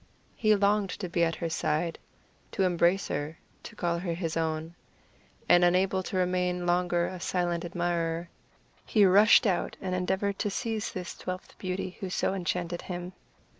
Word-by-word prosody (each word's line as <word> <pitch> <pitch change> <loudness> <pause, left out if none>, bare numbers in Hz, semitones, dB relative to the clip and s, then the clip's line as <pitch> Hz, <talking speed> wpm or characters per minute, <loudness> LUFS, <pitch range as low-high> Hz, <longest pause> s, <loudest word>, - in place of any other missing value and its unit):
He 215 -1 +4
longed 200 0 +2
to 185 - -2
be 170 0 +1
at 165 0 +1
her 170 - -3
side, 165 +2 -1 0.5
to 195 - +1
embrace 180 +1 +2
her, 145 +3 -3 0.2
to - - -10
call 170 -1 -1
her 170 -2 -2
his 165 -2 -3
own; 160 0 -2 0.7
and 175 - +6
unable 185 +2 +3
to 185 - -4
remain 180 -1 0
longer 175 0 +2
a 185 0 -5
silent 175 -1 -1
admirer, 170 -1 -1 0.6
he 210 -3 +4
rushed 205 +6 +6
out 190 -4 0
and 185 -1 -3
endeavored 190 +2 -1
to 205 - 0
seize 220 0 -2
this 180 -2 -6
twelfth 185 0 -6
beauty 185 0 -4
who 190 - -4
so 185 - 0
enchanted 175 -2 -2
him. 180 0 -6
180 Hz, 165 wpm, -29 LUFS, 170-190 Hz, 0.7 s, and